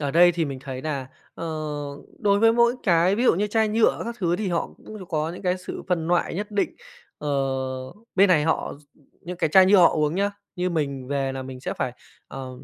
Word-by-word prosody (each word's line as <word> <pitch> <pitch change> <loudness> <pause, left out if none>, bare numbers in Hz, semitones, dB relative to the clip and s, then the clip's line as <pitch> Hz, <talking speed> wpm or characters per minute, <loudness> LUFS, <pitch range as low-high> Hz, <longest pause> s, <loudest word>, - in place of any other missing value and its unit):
ở 145 -2 -1
đây 175 +3 +6
thì 170 -1 0
mình 140 -3 -5
thấy 130 -2 -6
nà, 140 -4 -3 0.3
ờ, - - -6 0.7
đối 200 -3 +3
với 225 +1 +5
mỗi 235 +1 +4
cái 175 +1 +3
ví 235 - 0
dụ 245 - +5
như 205 +4 0
chai 220 +1 +1
nhựa 220 +1 +2
các 235 0 -5
thứ 175 -2 +1
thì 210 -1 -2
họ 170 -1 0
cũng 210 -4 -10
có 155 0 -1
những 180 - -9
cái 180 0 +1
sự 180 - -7
phân 165 -3 0
loại 175 -1 +1
nhất 205 +3 -4
định, 205 -1 -1 0.4
ờ, 150 - -4 0.9
bên 195 +1 +5
này 155 -5 +4
họ 160 - 0
x 150 - -24 0.4
những 180 +2 -7
cái 160 - +1
chai 190 +3 +7
nhựa 200 +2 +6
họ 170 - +8
uống 150 0 0
nhá, 200 +2 +1 0.3
như 180 0 0
mình 140 -5 -2
về 135 -1 -1
là 130 0 -5
mình 130 -1 -8
sẽ - - -3
phải, 125 - -2 0.4
ờ, 135 -1 -7
175 Hz, 235 wpm, -24 LUFS, 150-200 Hz, 0.9 s, họ